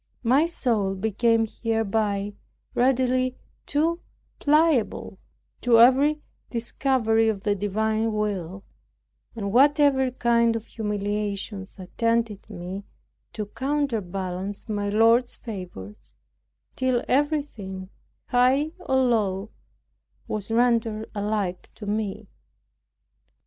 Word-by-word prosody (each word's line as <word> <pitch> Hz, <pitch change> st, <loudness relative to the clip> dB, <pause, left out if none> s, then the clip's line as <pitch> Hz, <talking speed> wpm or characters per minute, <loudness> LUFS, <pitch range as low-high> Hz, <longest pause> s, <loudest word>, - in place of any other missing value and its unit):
My 265 Hz, +7 st, +4 dB
soul 220 Hz, -, 0 dB
became 225 Hz, +3 st, +2 dB
hereby 215 Hz, -2 st, -1 dB, 0.4 s
readily 255 Hz, 0 st, +2 dB, 0.3 s
too 325 Hz, +4 st, +1 dB, 0.4 s
pliable 300 Hz, -5 st, +2 dB, 0.4 s
to 235 Hz, -2 st, +5 dB
every 280 Hz, +5 st, +5 dB, 0.3 s
discovery 230 Hz, -2 st, +1 dB
of 200 Hz, -3 st, -3 dB
the 205 Hz, -, +2 dB
divine 215 Hz, +3 st, 0 dB
will, 195 Hz, -3 st, -3 dB, 0.7 s
and 200 Hz, -3 st, -3 dB
whatever 280 Hz, 0 st, +4 dB
kind 235 Hz, -2 st, +2 dB
of 225 Hz, -1 st, -4 dB
humiliations 205 Hz, -2 st, -3 dB
attended 225 Hz, +2 st, -1 dB
me 185 Hz, 0 st, -6 dB, 0.5 s
to 215 Hz, -, -3 dB
counterbalance 205 Hz, -8 st, -3 dB
my 205 Hz, -2 st, -2 dB
Lord's 230 Hz, +4 st, +4 dB
favors, 105 Hz, -, -9 dB, 0.6 s
till 255 Hz, -2 st, +1 dB
everything, 250 Hz, -10 st, -1 dB, 0.4 s
high 260 Hz, +5 st, +3 dB
or 270 Hz, -7 st, -1 dB
low, 220 Hz, -6 st, +1 dB, 0.8 s
was 210 Hz, -1 st, -4 dB
rendered 225 Hz, -2 st, +1 dB
alike 205 Hz, -3 st, -2 dB
to 210 Hz, -, -9 dB
me. 210 Hz, 0 st, -3 dB
225 Hz, 90 wpm, -25 LUFS, 205-255 Hz, 0.8 s, to